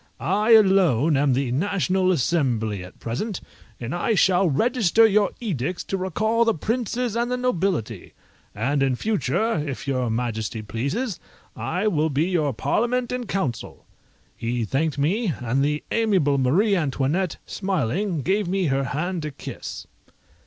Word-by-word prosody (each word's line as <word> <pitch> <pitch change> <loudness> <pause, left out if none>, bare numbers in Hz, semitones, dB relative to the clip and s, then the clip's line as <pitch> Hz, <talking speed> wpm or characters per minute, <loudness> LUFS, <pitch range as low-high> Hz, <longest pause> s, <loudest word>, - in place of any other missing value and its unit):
I 210 +5 +2
alone 180 - +5
am 140 -1 +3
the 130 -1 0
National 185 +4 +1
Assembly 120 - 0
at 90 - -13
present, 170 - -3 0.4
and 120 +1 -4
I 195 +6 0
shall 185 -1 +3
register 225 - +3
your 210 -1 +3
edicts 180 - -3
to - - -3
recall 215 +5 +1
the 230 -1 +2
princes 235 +4 -2
and 235 +1 0
the 250 - -1
nobility; 180 - -2 0.4
and 135 +7 0
in 135 -2 +2
future, 205 - 0
if 140 -3 -6
your 130 -3 0
majesty 110 -1 -3
pleases, 140 - -3 0.4
I 185 +6 -2
will 160 -5 +1
be 145 +1 +1
your 170 -6 +1
Parliament 235 - 0
and 250 -2 -3
Council." 140 - -3 0.5
He 115 0 -2
thanked 145 +6 -1
me, 180 +7 +1
and 125 +2 0
the 150 +1 -1
amiable 190 -12 +2
Marie 185 - +3
Antoinette, 155 +3 0
smiling, 185 - -1
gave 195 +1 +1
me 190 +1 0
her 135 0 0
hand 165 +7 -2
to 155 - -4
kiss. 140 - -8
170 Hz, 145 wpm, -23 LUFS, 135-205 Hz, 0.5 s, alone